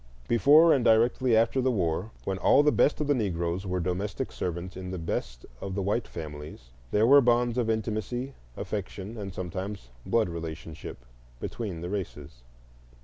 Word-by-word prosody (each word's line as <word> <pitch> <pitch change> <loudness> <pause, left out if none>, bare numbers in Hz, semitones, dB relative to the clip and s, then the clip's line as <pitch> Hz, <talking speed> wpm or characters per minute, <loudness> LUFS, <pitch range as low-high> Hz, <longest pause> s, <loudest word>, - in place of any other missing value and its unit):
Before 150 +8 +6
and 130 - +2
directly 115 +1 +4
after 115 +4 +2
the 130 - +2
war, 90 -3 0
when 95 -1 -2
all 140 +9 +5
the 150 - +4
best 145 - +3
of 150 - 0
the 145 - +3
Negroes 90 -5 -1
were 90 0 -1
domestic 90 +3 -2
servants 90 +1 -4
in 90 0 -6
the 95 - -4
best - - -4 0.2
of 95 -1 -4
the 100 - -1
white 105 +5 0
families, 75 -6 -8 0.2
there 105 +2 +3
were 140 +4 +8
bonds 120 -1 +2
of 120 -3 0
intimacy, 110 +4 -2 0.2
affection, 100 +1 -5
and 100 -3 -5
sometimes 95 -4 -5
blood 115 -2 +2
relationship, 80 -6 -7 0.3
between 95 - -5
the 85 - -4
races. 75 -10 -6
100 Hz, 165 wpm, -28 LUFS, 85-120 Hz, 0.3 s, were